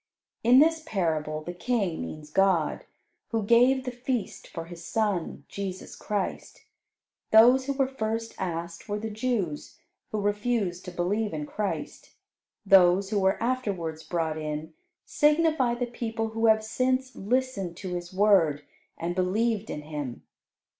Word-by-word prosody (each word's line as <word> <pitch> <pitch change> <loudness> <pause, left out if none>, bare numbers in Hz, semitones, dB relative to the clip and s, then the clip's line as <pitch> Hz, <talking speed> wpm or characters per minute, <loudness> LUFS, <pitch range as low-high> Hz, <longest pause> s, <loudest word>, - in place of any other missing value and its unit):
In 240 +3 +6
this 320 +3 +5
parable, 155 - -1
the 175 - -5
King 195 -2 -1
means 150 - -7
God, 190 -3 +2 0.4
who 225 -2 -1
gave 245 +5 +4
the 250 - -2
feast 245 -3 -3
for 165 -1 -7
His 170 0 -10
Son, 205 -4 -1
Jesus 190 -2 -6
Christ. 205 -2 -4 0.6
Those 245 +4 +6
who 280 - +1
were 270 -1 +1
first 225 -3 -3
asked 170 +2 -4
were 205 - -1
the 220 +1 -4
Jews, 210 -9 -2 0.3
who 215 - -1
refused 205 -3 -1
to 180 - -6
believe 195 +4 -1
in 150 -1 -3
Christ. 205 +6 -5 0.5
Those 190 0 +5
who 210 - +2
were 190 0 +2
afterwards 200 -11 -2
brought 160 -1 -2
in, 155 +1 -5 0.3
signify 300 -4 +3
the 245 +1 -1
people 225 -2 -3
who 225 +1 +1
have 220 0 +5
since 255 +3 0
listened 205 -6 -1
to 185 -2 -5
His 175 0 -5
Word, 185 -7 +3 0.3
and 170 +1 -2
believed 210 +4 0
in 150 - -5
Him. 145 -5 -6
205 Hz, 145 wpm, -27 LUFS, 175-235 Hz, 0.6 s, In